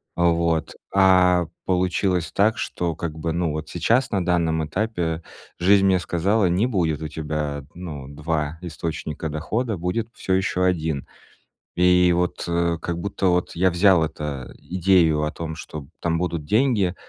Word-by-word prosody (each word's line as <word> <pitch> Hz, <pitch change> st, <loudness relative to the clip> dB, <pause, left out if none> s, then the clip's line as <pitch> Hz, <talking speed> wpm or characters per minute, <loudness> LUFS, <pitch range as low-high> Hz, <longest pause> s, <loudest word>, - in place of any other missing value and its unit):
вот. 85 Hz, -2 st, +1 dB, 0.2 s
А 90 Hz, -3 st, +5 dB, 0.2 s
получилось 90 Hz, -1 st, 0 dB
так, 105 Hz, +3 st, +2 dB
что, 85 Hz, -2 st, -2 dB
как 80 Hz, -1 st, -5 dB
бы, 80 Hz, +1 st, -2 dB
ну, 85 Hz, -1 st, 0 dB
вот 75 Hz, +1 st, -4 dB
сейчас, 120 Hz, +9 st, +1 dB
на 95 Hz, -3 st, 0 dB
данном 85 Hz, -3 st, +1 dB
этапе, 85 Hz, -2 st, -2 dB, 0.3 s
жизнь 95 Hz, +2 st, +4 dB
мне 95 Hz, -2 st, +4 dB
сказала, 95 Hz, +5 st, +1 dB
не 90 Hz, +6 st, +2 dB
будет 85 Hz, -, 0 dB
у 80 Hz, -, -3 dB
тебя, 75 Hz, -2 st, -3 dB
ну, 80 Hz, -7 st, -7 dB
2 75 Hz, +2 st, -3 dB
источника 80 Hz, -2 st, -4 dB
дохода, 105 Hz, +10 st, -2 dB
будет 90 Hz, +6 st, -2 dB
всё 95 Hz, -, -2 dB
ещё 95 Hz, -1 st, 0 dB
1. 80 Hz, -6 st, 0 dB, 0.7 s
И 90 Hz, 0 st, +5 dB
вот, 90 Hz, 0 st, -1 dB
э, 85 Hz, 0 st, +1 dB
как 85 Hz, -1 st, -3 dB
будто 95 Hz, +1 st, -1 dB
вот 90 Hz, 0 st, +1 dB
я 95 Hz, +2 st, +3 dB
взял 90 Hz, -1 st, +4 dB
это 75 Hz, -4 st, -5 dB
идею 90 Hz, -4 st, +2 dB
о 75 Hz, -, -1 dB
том, 80 Hz, -1 st, -6 dB
что 75 Hz, -4 st, -8 dB
там 85 Hz, -1 st, 0 dB
будут 85 Hz, -3 st, -2 dB
деньги 105 Hz, -, +2 dB
85 Hz, 155 wpm, -23 LUFS, 80-95 Hz, 0.7 s, А